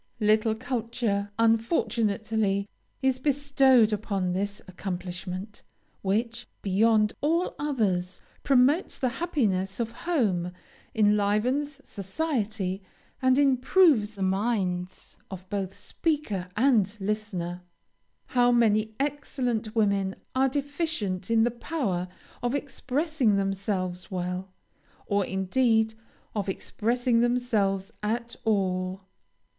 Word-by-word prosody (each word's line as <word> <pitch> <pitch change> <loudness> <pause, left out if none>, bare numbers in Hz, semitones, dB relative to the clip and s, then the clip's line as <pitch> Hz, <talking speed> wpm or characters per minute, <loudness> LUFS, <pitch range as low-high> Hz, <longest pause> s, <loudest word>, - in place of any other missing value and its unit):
Little 215 0 +3
culture, 225 -4 -2
unfortunately, 220 -3 +1 0.4
is 265 -1 +2
bestowed 270 -5 +4
upon 200 -3 -1
this 200 +3 -2
accomplishment, 185 +2 -6 0.4
which, 230 +4 -1 0.2
beyond 210 +2 +3
all 335 +5 +1
others, 200 -11 0 0.2
promotes 275 +5 +3
the 255 - +1
happiness 200 - 0
of 230 -1 -1 0.2
home, 185 - +1 0.4
enlivens 220 +7 +1
society, 205 - -2 0.4
and 260 0 +4
improves 270 - +4
the 195 - -3
minds 190 -2 -1
of 185 -1 -8
both 195 -2 -2
speaker 285 - -2
and 225 -5 +3
listener. 195 -4 -3 0.7
How 245 -1 +4
many 220 -2 +3
excellent 250 -6 -2
women 200 -3 +2 0.2
are 265 +1 +3
deficient 285 - -2
in 225 -1 +4
the 240 - +2
power 230 - -2 0.3
of 245 +2 0
expressing 280 -3 0
themselves 195 -2 -2
well, 180 0 -3 0.5
or, 200 0 +1
indeed, 220 +4 +2 0.4
of 200 -2 -1
expressing 235 +5 0
themselves 225 -5 +1
at 235 +3 -2
all! 185 -3 0
215 Hz, 95 wpm, -27 LUFS, 195-250 Hz, 0.7 s, bestowed